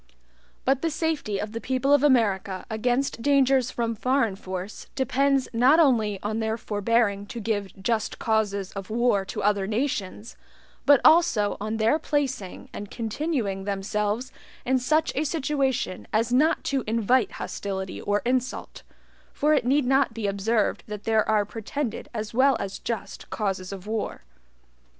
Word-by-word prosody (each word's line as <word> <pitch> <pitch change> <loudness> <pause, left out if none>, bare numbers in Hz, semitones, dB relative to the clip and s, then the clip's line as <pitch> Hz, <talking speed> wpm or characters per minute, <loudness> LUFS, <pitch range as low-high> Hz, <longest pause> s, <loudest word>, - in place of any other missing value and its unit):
But 270 0 +2
the 330 - +1
safety 310 -9 -1
of 210 - -4
the 230 +1 -5
people 265 +2 +1
of 290 - +5
America 205 -9 +2
against 245 +3 0
dangers 270 -1 +3
from 230 -2 -2
FOREIGN 240 -2 +1
force 190 +1 -7
depends 275 0 +2
not 255 +7 +5
only 225 -9 +3
on 215 +2 -2
their 220 0 -1
forbearing 205 -2 0
to 235 - -6
give 205 -2 -1
JUST 220 +2 -1
causes 205 -3 0
of 195 -2 -7
war 230 -3 +2
to - - -5
other 200 -1 +2
nations, 215 -2 -3 0.5
but 285 -3 +7
also 235 -11 +5
on 215 +1 -2
their 225 +8 +2
placing 270 - -2
and 205 - -7
continuing 225 -5 -2
themselves 210 +5 -2 0.3
in 260 +1 +2
such 305 +6 +1
a 290 - 0
situation 270 - -1
as 225 +3 +1
not 300 +6 +3
to 270 -3 -1
INVITE 230 +1 +2
hostility 190 -2 -5
or 205 0 0
insult; 255 +1 -2 0.5
for 300 +1 +2
it 260 -5 +2
need 275 +1 +3
not 270 -2 +2
be 225 -2 -3
observed 205 +2 0
that 210 -1 -6
there 220 -1 +2
are 210 -1 +3
PRETENDED 225 +3 -4
as 215 -2 -5
well 265 +1 +4
as 195 -1 -5
just 230 -3 -5
causes 195 -3 -2
of 195 -1 -8
war. 215 0 -3
230 Hz, 155 wpm, -25 LUFS, 205-265 Hz, 0.5 s, but